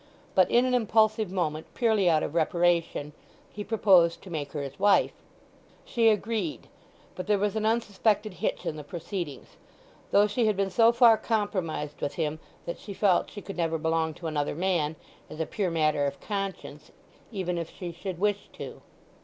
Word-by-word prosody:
But 185 Hz, -2 st, +4 dB
in 245 Hz, +1 st, +4 dB
an 255 Hz, -, 0 dB
impulsive 220 Hz, -3 st, +2 dB
moment, 160 Hz, -4 st, -2 dB
purely 220 Hz, -6 st, +3 dB
out 155 Hz, -2 st, +3 dB
of -, -, -3 dB
reparation, 170 Hz, -2 st, +1 dB, 0.4 s
he 205 Hz, -, -5 dB
proposed 190 Hz, -6 st, +4 dB
to 190 Hz, -, -11 dB
make 145 Hz, -4 st, -4 dB
her 145 Hz, -2 st, -3 dB
his 140 Hz, +4 st, -8 dB
wife. 200 Hz, 0 st, +4 dB, 0.7 s
She 230 Hz, -2 st, +3 dB
agreed. 210 Hz, -5 st, -1 dB, 0.5 s
But 185 Hz, 0 st, -7 dB
there 210 Hz, -1 st, +3 dB
was 205 Hz, +1 st, 0 dB
an 215 Hz, 0 st, 0 dB
unsuspected 215 Hz, -2 st, +1 dB
hitch 170 Hz, -, -3 dB
in 155 Hz, -, -3 dB
the 150 Hz, -, -7 dB
proceedings; 165 Hz, -1 st, -6 dB, 0.5 s
though 205 Hz, -, +5 dB
she 220 Hz, +2 st, +1 dB
had 210 Hz, -3 st, +1 dB
been 195 Hz, -1 st, 0 dB
so 225 Hz, +5 st, +5 dB
far 235 Hz, -2 st, +6 dB
compromised 185 Hz, -9 st, -2 dB
with 140 Hz, -, -2 dB
him 155 Hz, -1 st, -2 dB, 0.3 s
that 170 Hz, -, -5 dB
she 200 Hz, -, -8 dB
felt 190 Hz, -3 st, +2 dB
she 205 Hz, -, -9 dB
could 195 Hz, -, -8 dB
never 165 Hz, -1 st, 0 dB
belong 160 Hz, 0 st, 0 dB
to 170 Hz, -, -11 dB
another 150 Hz, -3 st, -1 dB
man, 170 Hz, -3 st, 0 dB, 0.3 s
as 155 Hz, -, -9 dB
a 160 Hz, -, 0 dB
pure 195 Hz, +1 st, -2 dB
matter 155 Hz, -3 st, +1 dB
of 140 Hz, 0 st, -5 dB
conscience, 195 Hz, -2 st, -5 dB, 0.4 s
even 180 Hz, -5 st, -2 dB
if 165 Hz, -, -5 dB
she 175 Hz, -2 st, -7 dB
should 175 Hz, +1 st, -6 dB
wish 205 Hz, +2 st, -1 dB
to. -, -, -8 dB
185 Hz, 180 wpm, -27 LUFS, 160-210 Hz, 0.7 s, far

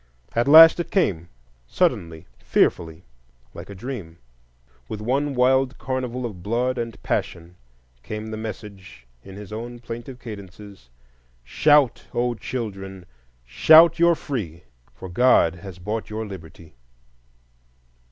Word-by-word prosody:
At 120 Hz, +2 st, 0 dB
last 160 Hz, +3 st, +9 dB
it 175 Hz, -, -3 dB
came,—suddenly, 80 Hz, -, -2 dB
fearfully, 80 Hz, 0 st, 0 dB, 0.5 s
like -, -, -10 dB
a 100 Hz, -, -9 dB
dream. 95 Hz, -7 st, -8 dB, 0.7 s
With 105 Hz, -, -5 dB
one 135 Hz, +6 st, -1 dB
wild 130 Hz, +1 st, +2 dB
carnival 125 Hz, -1 st, -4 dB
of 100 Hz, -7 st, -7 dB
blood 120 Hz, +5 st, -1 dB
and 115 Hz, -1 st, -5 dB
passion 85 Hz, +1 st, -3 dB, 0.5 s
came 105 Hz, -, -6 dB
the -, -, -4 dB
message 100 Hz, -, -9 dB, 0.2 s
in 95 Hz, 0 st, -12 dB
his 105 Hz, 0 st, -10 dB
own 120 Hz, +2 st, -7 dB
plaintive 120 Hz, +2 st, -9 dB
cadences:— 100 Hz, -, -11 dB, 0.5 s
"Shout, 145 Hz, -, +2 dB
O 120 Hz, 0 st, 0 dB
children! 95 Hz, -5 st, -7 dB, 0.4 s
Shout, 160 Hz, -, +6 dB
you're 170 Hz, 0 st, +4 dB
free! 110 Hz, -, -6 dB, 0.3 s
For 65 Hz, +10 st, -11 dB
God 90 Hz, -4 st, +3 dB
has 95 Hz, -1 st, -10 dB
bought 105 Hz, +5 st, -5 dB
your 110 Hz, +1 st, -5 dB
liberty!" 85 Hz, -4 st, -12 dB
110 Hz, 120 wpm, -23 LUFS, 90-125 Hz, 0.7 s, last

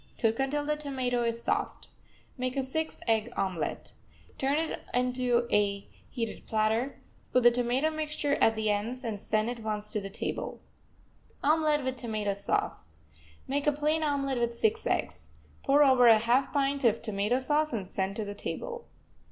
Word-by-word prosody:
Cook 225 Hz, 0 st, +1 dB
until 290 Hz, +2 st, 0 dB
the 300 Hz, 0 st, +1 dB
tomato 260 Hz, -5 st, -1 dB
is 230 Hz, 0 st, -2 dB
soft. -, -, -2 dB, 0.5 s
Make 255 Hz, +1 st, -3 dB
a 270 Hz, -, +1 dB
six 315 Hz, +5 st, -2 dB
egg 225 Hz, +1 st, +1 dB
omelet. 180 Hz, -6 st, -2 dB, 0.5 s
Turn 275 Hz, +2 st, +1 dB
it 320 Hz, 0 st, -2 dB, 0.2 s
onto 250 Hz, -1 st, +1 dB
a 200 Hz, -1 st, +1 dB, 0.2 s
heated 230 Hz, -3 st, -5 dB
platter, 220 Hz, +5 st, 0 dB, 0.3 s
put 250 Hz, -, +3 dB
the 240 Hz, -, +8 dB
tomato 245 Hz, +5 st, +1 dB
mixture 305 Hz, -2 st, -1 dB
at 225 Hz, -, +4 dB
the 215 Hz, -1 st, +1 dB
ends, 230 Hz, +6 st, -2 dB
and 215 Hz, -4 st, -4 dB
send 215 Hz, +1 st, 0 dB
at 245 Hz, -, -6 dB
once 210 Hz, -1 st, -3 dB
to 210 Hz, -, -1 dB
the 195 Hz, -, -5 dB
table. 195 Hz, -, -4 dB, 0.8 s
OMELET 305 Hz, 0 st, +3 dB
WITH 260 Hz, 0 st, -2 dB
TOMATO 215 Hz, -4 st, -1 dB
SAUCE 75 Hz, -, -2 dB, 0.5 s
Make 285 Hz, +2 st, -1 dB
a -, -, +6 dB
plain 300 Hz, +2 st, 0 dB
omelet 275 Hz, -4 st, 0 dB
with 235 Hz, 0 st, -1 dB
six 220 Hz, -2 st, +1 dB
eggs. 75 Hz, 0 st, -2 dB, 0.3 s
Pour 285 Hz, +2 st, +5 dB
over 260 Hz, -3 st, +6 dB
a 225 Hz, -1 st, +8 dB
half 240 Hz, +5 st, +2 dB
pint 280 Hz, -1 st, 0 dB
of 230 Hz, -2 st, +2 dB
tomato 210 Hz, +2 st, 0 dB
sauce, 295 Hz, +4 st, +1 dB
and 215 Hz, -6 st, -3 dB
send 190 Hz, +1 st, -3 dB
to 215 Hz, -, -3 dB
the 205 Hz, -, -5 dB
table. 470 Hz, -, -6 dB
245 Hz, 170 wpm, -29 LUFS, 215-280 Hz, 0.8 s, the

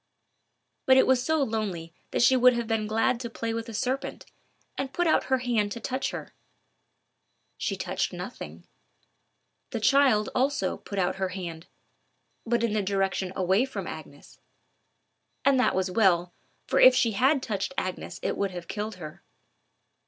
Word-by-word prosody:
But 260 Hz, 0 st, +7 dB
it -, -, +6 dB
was 260 Hz, -1 st, +3 dB
so 315 Hz, +1 st, +1 dB
lonely 200 Hz, -8 st, -3 dB, 0.2 s
that -, -, +1 dB
she 260 Hz, +2 st, +6 dB
would 250 Hz, 0 st, +6 dB
have 235 Hz, -1 st, -2 dB
been 220 Hz, -1 st, -1 dB
glad 225 Hz, +2 st, +1 dB
to 235 Hz, -1 st, -5 dB
play 230 Hz, 0 st, -4 dB
with 230 Hz, +1 st, -4 dB
a -, -, -7 dB
serpent, 260 Hz, +5 st, -3 dB, 0.5 s
and 270 Hz, 0 st, -3 dB
put 350 Hz, -, 0 dB
out 320 Hz, -, +3 dB
her 260 Hz, -, +2 dB
hand 235 Hz, -5 st, 0 dB
to 235 Hz, -, -7 dB
touch 260 Hz, +4 st, -2 dB
her. -, -, -7 dB, 1.2 s
She -, -, -2 dB
touched -, -, -2 dB
nothing. -, -, -8 dB, 1.1 s
The 230 Hz, -, -3 dB
child, 250 Hz, -2 st, +4 dB
also, 265 Hz, -7 st, 0 dB
put 200 Hz, -, -8 dB
out 180 Hz, 0 st, 0 dB
her 190 Hz, -1 st, -1 dB
hand—but 185 Hz, +6 st, -7 dB
in 230 Hz, -2 st, +1 dB
the 215 Hz, -, +1 dB
direction 195 Hz, -1 st, -1 dB
away 190 Hz, +4 st, +2 dB
from 265 Hz, -, -5 dB
Agnes. -, -, -10 dB, 1.1 s
And 275 Hz, -2 st, +4 dB
that 255 Hz, -, +2 dB
was 185 Hz, 0 st, 0 dB
well, 180 Hz, -4 st, +2 dB, 0.3 s
for -, -, +1 dB
if 255 Hz, 0 st, +8 dB
she 235 Hz, -3 st, +3 dB
had 265 Hz, +6 st, +2 dB
touched 205 Hz, +1 st, -2 dB
Agnes 185 Hz, -1 st, -4 dB
it -, -, -1 dB
would 200 Hz, -, -1 dB
have 175 Hz, -2 st, -8 dB
killed 210 Hz, 0 st, -4 dB
her. 155 Hz, -4 st, -10 dB
225 Hz, 165 wpm, -27 LUFS, 190-255 Hz, 1.2 s, if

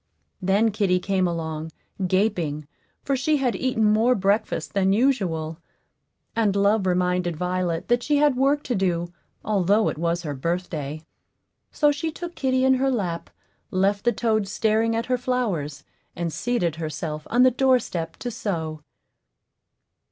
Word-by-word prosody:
Then 200 Hz, +4 st, +3 dB
kitty 195 Hz, -3 st, +1 dB
came 185 Hz, 0 st, +1 dB
along, 160 Hz, -2 st, -4 dB, 0.4 s
gaping, 175 Hz, -7 st, 0 dB, 0.4 s
for 275 Hz, -, 0 dB
she 300 Hz, +3 st, +1 dB
had 255 Hz, -4 st, 0 dB
eaten 255 Hz, -4 st, 0 dB
more 220 Hz, +4 st, +4 dB
breakfast 205 Hz, +2 st, 0 dB
than 195 Hz, -1 st, +2 dB
usual; 180 Hz, -, 0 dB, 0.8 s
and 215 Hz, -3 st, +2 dB
Love 200 Hz, 0 st, +2 dB
reminded 180 Hz, -1 st, +1 dB
Violet 180 Hz, -1 st, -1 dB
that 240 Hz, 0 st, +2 dB
she 295 Hz, +3 st, +1 dB
had 290 Hz, -2 st, +4 dB
work 275 Hz, +3 st, +2 dB
to 250 Hz, -, -2 dB
do, 175 Hz, -4 st, -1 dB, 0.3 s
although 205 Hz, +1 st, +2 dB
it -, -, -5 dB
was 170 Hz, +1 st, 0 dB
her 150 Hz, -3 st, -3 dB
birthday; 155 Hz, 0 st, -3 dB, 0.7 s
so 295 Hz, -2 st, +3 dB
she 290 Hz, +3 st, -2 dB
took 345 Hz, +2 st, -7 dB
kitty 260 Hz, -4 st, +1 dB
in 265 Hz, -, +5 dB
her 265 Hz, +1 st, +2 dB
lap, 185 Hz, -9 st, -2 dB, 0.4 s
left 195 Hz, +2 st, +1 dB
the 240 Hz, -, +3 dB
toads 215 Hz, -3 st, 0 dB
staring 220 Hz, +1 st, +1 dB
at 230 Hz, +1 st, -1 dB
her 250 Hz, -1 st, 0 dB
flowers, 185 Hz, -, -2 dB, 0.3 s
and 170 Hz, -2 st, -3 dB
seated 175 Hz, -3 st, -1 dB
herself 155 Hz, -1 st, -4 dB
on 245 Hz, +2 st, +4 dB
the 255 Hz, -, +6 dB
doorstep 250 Hz, -10 st, +1 dB
to 245 Hz, -, -4 dB
sew. 165 Hz, -9 st, -3 dB
200 Hz, 150 wpm, -24 LUFS, 170-245 Hz, 0.8 s, the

